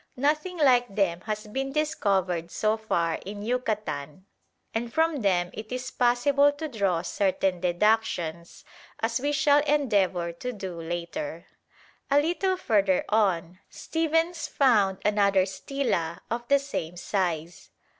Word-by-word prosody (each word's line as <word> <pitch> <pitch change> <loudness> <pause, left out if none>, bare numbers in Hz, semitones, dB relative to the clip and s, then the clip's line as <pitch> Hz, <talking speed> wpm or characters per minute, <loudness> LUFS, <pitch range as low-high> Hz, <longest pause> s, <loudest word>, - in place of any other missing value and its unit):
Nothing 305 +7 0
like 245 -8 +3
them 175 -4 +1
has 215 0 -3
been 270 +6 -3
discovered 195 - 0
so 215 +5 +1
far 170 -7 -1
in 205 +1 -7
Yucatan, 210 - -3 0.5
and 230 +1 -2
from 320 +2 +2
them 180 -3 +1
it 215 +1 -8
is 255 +1 -4
possible 270 +4 +3
to 310 +2 -5
draw 195 - 0
certain 190 -1 0
deductions, 175 -3 0 0.3
as 230 +1 0
we 285 +3 0
shall 295 -1 +4
endeavour 205 - +1
to 250 +9 -5
do 190 -6 -6
later. 175 - -5 0.6
A 280 +1 +5
little 355 +5 0
further 200 - +2
on, 185 -5 +1
Stephens 325 +1 -1
found 210 -8 +3
another 200 -2 +3
stela 190 -5 -2
of 240 +1 -3
the 280 - +5
same 180 - -5
size. 175 -3 -3
215 Hz, 130 wpm, -27 LUFS, 180-275 Hz, 0.6 s, A